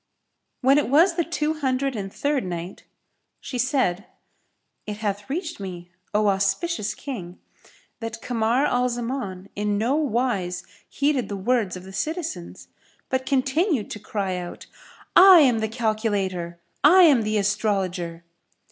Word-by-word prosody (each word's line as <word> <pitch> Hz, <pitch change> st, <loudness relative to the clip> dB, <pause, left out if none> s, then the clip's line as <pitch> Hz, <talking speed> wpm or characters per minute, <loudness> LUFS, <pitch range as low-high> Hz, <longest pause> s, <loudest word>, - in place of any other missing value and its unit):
When 270 Hz, +2 st, +5 dB
it 290 Hz, -, -2 dB
was 330 Hz, +7 st, +5 dB
the 340 Hz, 0 st, 0 dB
Two 315 Hz, -2 st, -1 dB
Hundred 270 Hz, -3 st, -1 dB
and 195 Hz, -2 st, -5 dB
Third 285 Hz, +1 st, -1 dB
Night, 175 Hz, 0 st, -6 dB, 0.5 s
She 250 Hz, -, -5 dB
said, 240 Hz, -7 st, 0 dB, 0.8 s
It 210 Hz, -1 st, -4 dB
hath 205 Hz, +1 st, -3 dB
reached 330 Hz, -, -4 dB
me, 180 Hz, -3 st, -7 dB, 0.2 s
O 210 Hz, 0 st, +2 dB
auspicious 200 Hz, -, 0 dB
King, 185 Hz, -11 st, -7 dB, 0.6 s
that 225 Hz, -1 st, -5 dB
Kamar 235 Hz, +3 st, +1 dB
al 250 Hz, -1 st, +1 dB
Zaman 235 Hz, -6 st, -4 dB
in 210 Hz, 0 st, 0 dB
no 230 Hz, +6 st, +1 dB
wise 240 Hz, -, -1 dB, 0.3 s
heeded 280 Hz, -5 st, 0 dB
the 200 Hz, -, -3 dB
words 205 Hz, -2 st, 0 dB
of 180 Hz, -, -10 dB
the 190 Hz, +1 st, -11 dB
citizens, 315 Hz, -, -4 dB, 0.4 s
but 260 Hz, 0 st, -1 dB
continued 270 Hz, -, +1 dB
to 210 Hz, -, -5 dB
cry 195 Hz, -3 st, -3 dB
out, 175 Hz, -1 st, -7 dB, 0.5 s
"I 370 Hz, -2 st, +9 dB
am 250 Hz, -6 st, +4 dB
the 220 Hz, 0 st, -1 dB
Calculator! 205 Hz, -7 st, -2 dB, 0.2 s
I 360 Hz, +6 st, +8 dB
am 285 Hz, -8 st, +6 dB
the 215 Hz, 0 st, 0 dB
Astrologer!" 195 Hz, -5 st, -1 dB
225 Hz, 140 wpm, -24 LUFS, 195-275 Hz, 0.8 s, I